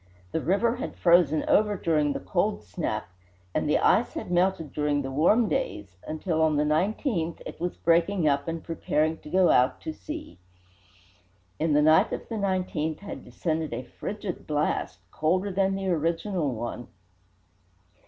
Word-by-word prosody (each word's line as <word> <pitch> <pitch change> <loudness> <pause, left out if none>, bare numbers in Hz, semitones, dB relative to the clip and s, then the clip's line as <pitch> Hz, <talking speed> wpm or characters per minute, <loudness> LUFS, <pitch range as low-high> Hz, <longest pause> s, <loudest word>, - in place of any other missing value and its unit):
The 160 - -1
river 230 +9 +1
had 270 - -5
frozen 170 -3 +4
over 210 -1 +3
during 150 -4 +1
the - - -3
"cold 205 +3 -1
snap," 110 - -3 0.5
and - - 0
the - - +4
ice - - +3
had - - -5
melted 175 -3 +1
during 150 -1 0
the 135 - -4
warm 190 - +3
days, 100 - -3
until, 160 +1 -1
on 160 -1 +3
the 150 - +3
19th, 170 - 0
it - - -8
was 175 0 -2
breaking 170 +1 +2
up 140 0 +1
and 165 0 -4
preparing 160 -1 -1
to - - -12
go 185 +1 +4
out 125 +1 +3
to 315 - -5
sea. 310 - -8 1.2
In 155 -1 +1
the 150 +1 +4
night 155 +1 +5
of - - -5
the 230 - -3
19th 185 -6 -1
had 200 - -7
descended 160 -6 -3
a 125 - -5
frigid 190 - -6
blast, 150 0 -1
colder 185 +6 0
than 195 0 +1
the 195 -1 -2
original 165 0 0
one. 120 +1 -5
165 Hz, 165 wpm, -27 LUFS, 150-190 Hz, 1.2 s, night